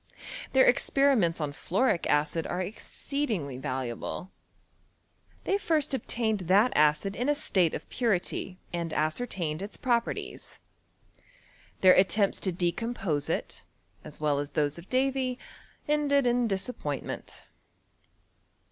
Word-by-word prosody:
Their 265 0 +6
experiments 245 -10 +3
on 150 -2 -2
fluoric 185 - 0
acid 150 +2 +1
are 175 - -3
exceedingly 200 - -3
valuable. 130 +6 -4 1.1
They 395 - +1
first 310 -7 +1
obtained 225 -4 -1
that 205 +6 +5
acid 150 +7 +3
in 250 +4 -1
a 295 - +3
state 185 - +2
of - - -7
purity, 190 -5 -1 0.2
and 170 -2 -3
ascertained 155 0 -1
its 200 +2 -6
properties. 240 -2 -2 1.2
Their 185 -1 +8
at 185 0 +5
tempts 200 -2 +2
to 190 - +1
decompose 175 -2 -1
it - - -3 0.4
as 150 - -7
well 150 -2 +1
as 145 0 -3
those 150 +1 -1
of 170 - -14
Davy, 260 -1 +1 0.5
ended 290 -2 +2
in 245 0 +2
disappointment. 190 - -4
190 Hz, 120 wpm, -28 LUFS, 155-250 Hz, 1.2 s, Their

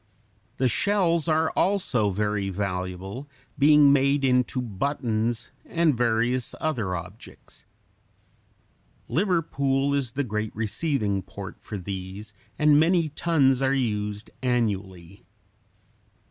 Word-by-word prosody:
The 130 - +2
shells 170 - +1
are 160 0 +2
also 175 - +1
very 105 0 -1
valuable, 95 +6 -4 0.3
being 145 -1 +6
made 140 0 +2
into 125 0 +2
buttons 115 -1 -2
and 165 -4 +1
various 120 +1 0
other 115 -13 -1
objects. 90 +5 -11 1.4
Liverpool 140 -7 +1
is 135 -5 -1
the 145 - -1
great 105 -3 -3
receiving 110 -2 -1
port - - -9
for 105 - -6
these, 95 +2 -7 0.2
and 150 -1 +5
many 165 0 +3
tons 140 -4 +2
are 135 0 +2
used 105 -4 -2
annually. 100 -7 -2
125 Hz, 105 wpm, -25 LUFS, 105-145 Hz, 1.4 s, being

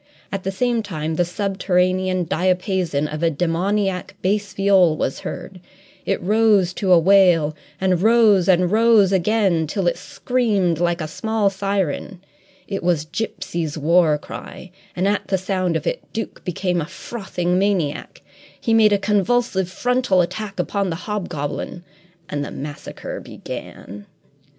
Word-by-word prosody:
At 195 - -3
the 195 - -3
same 235 +3 0
time 160 -6 -4
the 175 - +2
subterranean 185 -1 0
diapason 180 -3 0
of 150 +1 -6
a 165 - +3
demoniac 180 +4 -1
bass 200 +2 0
viol 190 -5 +3
was 135 - -2
heard; 185 -2 -7 0.5
it - - +1
rose 205 -2 +3
to 190 -1 -1
a 180 - +8
wail, 170 -4 +4 0.2
and 185 -2 +1
rose 215 -4 +4
and 180 -1 +3
rose 220 -3 +5
again 190 -4 +2
till 190 +4 -2
it 175 - +1
screamed 205 -10 0
like 175 0 0
a 155 - -3
small 220 +4 0
siren. 195 -2 -2 0.5
It 195 -1 -3
was 170 -3 +1
Gipsy's 165 -3 -4
war 160 0 +3
cry, 180 +4 -10 0.2
and, 185 +2 0
at 205 +1 0
the 190 - +1
sound 185 -2 -1
of - - -2
it, - - -1
Duke 225 - -5
became 180 -1 -1
a 150 - -5
frothing 180 -4 -3
maniac. 190 -7 -1 0.4
He 230 - 0
made 215 -2 +5
a - - +4
convulsive 205 -1 +1
frontal 245 -1 +1
attack 195 +2 -4
upon 195 +2 -1
the 165 - -2
hobgoblin 175 -4 -4 0.4
and 145 -4 -3
the - - -5
massacre 145 +1 -7
began. 100 +2 -9
185 Hz, 145 wpm, -21 LUFS, 170-205 Hz, 0.5 s, a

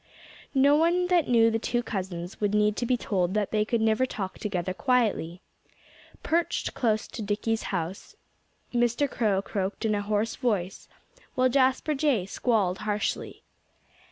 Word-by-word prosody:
No 280 +2 +5
one 340 +3 +3
that 350 -4 +3
knew 230 -2 +4
the 225 - 0
two 240 +1 -1
cousins 185 -4 -5
would 205 0 +1
need 210 0 +3
to 240 - -1
be 250 - +2
told 190 -4 -1
that 210 -2 0
they 215 -1 +2
could 225 +1 -1
never 220 +4 +2
talk 195 -6 -5
together 185 -3 -2
quietly. 210 - 0 0.8
Perched 335 +1 0
close 220 -4 0
to 230 - -7
Dickie's 215 +2 -1
house, 180 0 -4 0.6
Mr. 240 +4 +2
Crow 210 -6 0
croaked 200 +2 -3
in 215 - +2
a 205 - 0
hoarse 210 +2 -1
voice, 200 -7 -2 0.5
while 255 0 +3
Jasper 265 +3 +2
Jay 270 -9 +1
squalled 195 -3 0
harshly. 210 0 -3
220 Hz, 155 wpm, -27 LUFS, 200-250 Hz, 0.8 s, No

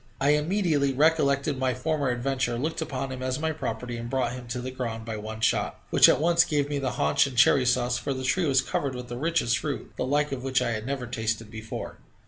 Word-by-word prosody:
I 140 - +2
immediately 150 -3 +1
recollected 140 -1 +2
my 130 -1 0
former 145 +1 -1
adventure, 125 -1 -1
looked 155 +6 -2
upon 135 -3 -3
him 130 -1 -6
as 130 0 -1
my 160 +1 -1
property, 125 -6 -4
and 115 0 -6
brought 130 -2 0
him 125 -1 -8
to 120 +2 -4
the 130 +1 -5
ground 115 -3 -4
by 115 -1 -4
one 110 +1 -7
shot, - - +1
which - - +7
at - - +3
once 170 +2 +4
gave 145 -4 0
me 145 -1 -1
the 130 -2 -2
haunch 75 - +2
and 130 -3 -8
cherry 130 +1 +5
sauce, 120 0 +1
for - - -3
the 130 -1 -3
tree 170 +6 +1
was 135 -2 +4
covered 135 -1 -2
with 125 0 -7
the 120 - -5
richest 155 -6 +1
fruit, 145 -3 -4
the - - -1
like 145 +3 +1
of 135 -2 -3
which 135 0 +1
I 125 -2 0
had 110 +1 -4
never 135 -2 -3
tasted 115 -2 -3
before. 110 0 -7
130 Hz, 240 wpm, -26 LUFS, 120-145 Hz, -, which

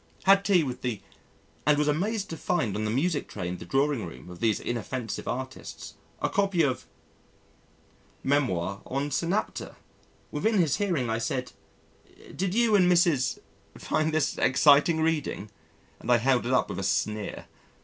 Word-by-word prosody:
Had 195 +1 +6
tea 190 -4 +4
with 130 -3 -5
the 120 -5 -2 0.6
and 150 0 +4
was 150 0 +1
amazed 195 +8 0
to - - -3
find 160 - -1
on 110 +1 -2
the - - -1
music 145 +6 0
tray 90 - -5
in 90 0 -4
the - - -8
drawing 135 -3 +1
room 85 +1 -11
of 90 - -11
these 110 -2 +1
inoffensive 120 0 -4
artists 130 +1 -6 0.3
a - - +3
copy 195 -4 +1
of 130 -3 +1
's - - -19 1.4
Memoir 100 -10 0
on 140 +2 -2
Synapta. 175 +7 -2 0.6
Within 220 -1 +1
his 165 -7 +2
hearing, 175 -12 0
I 115 0 -1
said, 125 +1 -2 0.8
"Did 185 +1 -1
you 235 -2 +3
and 180 -3 +5
Mrs. 170 -7 +3 0.4
find 155 0 0
this 155 -3 0
exciting 145 +4 +5
reading?" 150 -10 -1 0.5
And 125 - -2
I 120 - +7
held 125 0 +2
it - - -1
up 130 - +2
with 95 - -4
a - - -3
sneer. 105 +2 -1
140 Hz, 165 wpm, -27 LUFS, 120-170 Hz, 1.4 s, I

